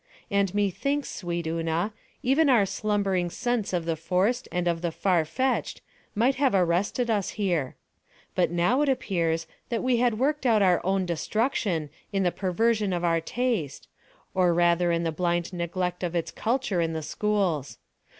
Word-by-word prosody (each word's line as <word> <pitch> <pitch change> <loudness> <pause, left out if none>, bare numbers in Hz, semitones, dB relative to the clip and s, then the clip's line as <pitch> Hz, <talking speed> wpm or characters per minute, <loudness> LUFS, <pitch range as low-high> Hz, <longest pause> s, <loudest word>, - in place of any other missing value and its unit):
And 200 -1 +1
methinks, 275 +9 0
sweet 175 -2 -3
Una, 165 +5 -1 0.3
even 275 +4 +3
our 235 -6 +5
slumbering 195 -2 0
sense 240 +2 -1
of 175 -3 -1
the 165 -1 0
forced 180 +9 0
and 180 0 -1
of 170 -1 0
the 170 -1 -1
far 175 -1 +1
fetched 260 +10 -1 0.3
might 245 +5 +2
have 270 -6 +2
arrested 190 +7 +1
us 205 -3 0
here. 175 -10 0 0.6
But 180 - +2
now 175 - +2
it 295 - +2
appears 170 -10 0 0.2
that 235 - -1
we 255 -1 +2
had 235 -2 +2
worked 280 +2 +1
out 220 -3 +4
our 180 -2 +3
own 190 0 +1
destruction 175 - -1 0.2
in 195 -1 +1
the 180 - +2
perversion 210 +2 0
of 175 0 -2
our 165 -1 +2
taste, 215 - -2 0.5
or 180 -2 +3
rather 175 0 +3
in 170 0 0
the 165 - 0
blind 175 +2 -1
neglect 180 +1 -2
of 175 -1 -2
its 170 - -1
culture 225 -6 0
in 165 -1 -1
the 160 -1 -3
schools. 185 -7 -1
185 Hz, 170 wpm, -26 LUFS, 170-225 Hz, 0.6 s, our